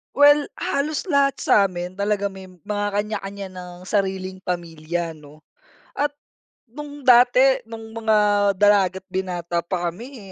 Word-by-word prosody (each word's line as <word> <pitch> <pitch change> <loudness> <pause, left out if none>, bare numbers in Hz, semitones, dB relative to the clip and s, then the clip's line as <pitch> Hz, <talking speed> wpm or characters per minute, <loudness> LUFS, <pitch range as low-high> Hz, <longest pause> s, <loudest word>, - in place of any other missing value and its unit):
Well, 290 0 +5
halos 295 +4 -2
lahat 280 -5 +2
sa'min 180 -3 +1
talaga 200 +1 -1
may 190 -1 -11
mga 205 +3 -4
kanya-kanya 200 -1 -4
ng 180 0 -10
sariling 190 -2 -2
pamilya 170 -1 -4
'no. 150 0 -17 0.5
At 290 0 -2 0.5
nung 290 +2 -10
dati, 250 +2 +6
nung 225 -1 -9
mga 210 -2 +3
dalaga't 190 -2 +3
binata 175 -2 -2
pa 175 0 -2
kami, 220 +2 -11
200 Hz, 120 wpm, -22 LUFS, 180-240 Hz, 0.5 s, dati